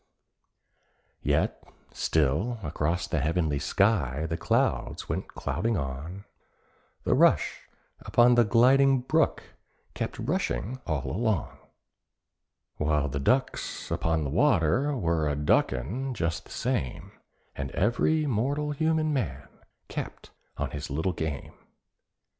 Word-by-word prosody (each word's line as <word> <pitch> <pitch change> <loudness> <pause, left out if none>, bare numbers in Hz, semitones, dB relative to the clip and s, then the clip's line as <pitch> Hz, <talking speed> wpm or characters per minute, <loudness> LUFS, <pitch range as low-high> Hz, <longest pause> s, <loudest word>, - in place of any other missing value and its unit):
Yet - - 0 0.3
still 80 - +1
across 85 +3 -1
the 85 -2 -1
heavenly 75 0 0
sky 80 - +1
the 80 - -2
clouds 85 - 0
went - - -3
clouding 115 -1 -2
on, 80 +8 -5 0.8
The - - +2
rush - - +2 0.3
upon 120 +1 +4
the 120 0 +6
gliding 130 +4 +5
brook 155 +5 +1 0.5
kept - - -4
rushing 110 - -2
all 75 -5 -1
alone, 110 - -1 1.2
While 75 -1 +1
the 70 - -3
ducks 130 - 0
upon 80 -1 0
the 70 - -3
water 130 - +2
were 85 -6 +1
a 75 - 0
ducking 120 - 0
just 85 -5 -2
the - - -16
same, 65 - -2 0.4
And 70 -1 -4
every 135 +9 +2
mortal 140 +4 0
human 155 +1 +1
man 135 -4 -2 0.4
kept - - -6 0.3
on - - -2
his 75 -1 -5
little 80 +6 -1
game. 80 -4 -4
90 Hz, 115 wpm, -28 LUFS, 75-125 Hz, 1.2 s, the